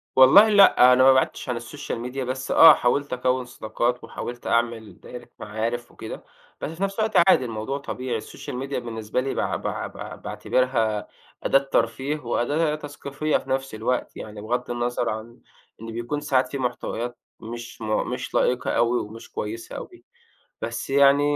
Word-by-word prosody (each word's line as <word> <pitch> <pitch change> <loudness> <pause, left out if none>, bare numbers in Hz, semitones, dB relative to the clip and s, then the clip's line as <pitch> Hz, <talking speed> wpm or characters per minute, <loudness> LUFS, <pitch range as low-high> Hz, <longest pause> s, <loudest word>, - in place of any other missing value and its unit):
والله 135 +12 +8
لأ، 195 -11 +7
أنا 130 +1 +5
ما 135 0 +8
بعِدتش 130 0 0
عن 125 - 0
السوشيال 120 +2 -6
ميديا 125 +3 -4
بس 130 +1 -4
آه 160 -1 +10
حاولت 140 +2 0
أكوّن 125 0 0
صداقات، 120 +1 -2
وحاولت 120 0 -7
أعمل 115 -4 -1
دايرة 125 -1 -10
معارِف 115 +3 -3
وكده، - - -8 0.4
بس - - -3
في 165 +4 -5
نفس 195 +2 -2
الوقت 220 0 0
عادي 130 - +5
الموضوع 115 +4 -3
طبيعي 130 -3 -4
السوشيال 110 - -8
ميديا 135 +1 -3
بالنسبة 115 0 -3
لي 135 +1 -2
باع - - -1
باع - - -3
باع - - -8
باعتبرها 115 -5 -1 0.4
أداة 135 - +4
ترفيه 135 +2 -1
وأداة 150 +5 0
تثقيفية 145 0 -2
في - - -11
نَفْس 135 -2 -2
الوقت 115 +4 -2
يعني، 105 -1 -8
بغض 120 +3 -2
النظر 120 0 -1
عن 110 +2 -6 0.4
إن 115 0 -7
بيكون 120 +6 -3
ساعات 135 -3 +2
في 140 - -5
محتويات 120 -1 -3 0.2
مش 115 +1 -8
م 110 -1 0
مش - - -5
لائقة 125 - +1
أوي 120 +1 +2
ومش 110 +2 -10
كويسة 110 +2 -5
أوي - - -10 0.6
بس 115 +3 -4
يعني 140 +1 +5
125 Hz, 165 wpm, -24 LUFS, 115-135 Hz, 0.6 s, آه